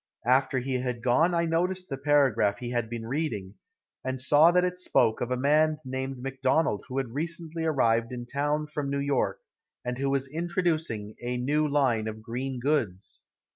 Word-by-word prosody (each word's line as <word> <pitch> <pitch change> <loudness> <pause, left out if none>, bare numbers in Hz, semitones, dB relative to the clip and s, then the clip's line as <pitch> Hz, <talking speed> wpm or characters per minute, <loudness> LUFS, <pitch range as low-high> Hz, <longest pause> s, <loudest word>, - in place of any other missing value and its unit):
After 130 +2 +3
he 130 0 -1
had 125 -2 -3
gone 160 +8 +3
I 170 0 +2
noticed 180 +3 0
the 135 - -3
paragraph 135 -8 +3
he 120 -1 -5
had 120 -2 -1
been 115 -1 -5
reading, 115 -8 -3 0.5
and 130 0 -3
saw 145 +5 +6
that 180 +1 +3
it 180 0 -1
spoke 115 -10 +2
of 125 - -1
a 125 - 0
man 150 +3 +3
named 130 +1 -4
Macdonald 135 -2 0
who 130 - -5
had 130 -4 -2
recently 165 +2 -3
arrived 115 -6 +2
in 120 -1 -5
town 145 +4 -1
from 150 -2 -4
New 140 - -1
York, 140 -1 0 0.4
and 125 +1 -3
who 140 0 0
was 135 0 0
introducing 160 - -2
a 125 +1 -2
new 150 +5 +1
line 130 -7 +1
of 110 0 -6
green 125 +3 -4
goods. 120 -9 -2
135 Hz, 180 wpm, -28 LUFS, 120-155 Hz, 0.5 s, saw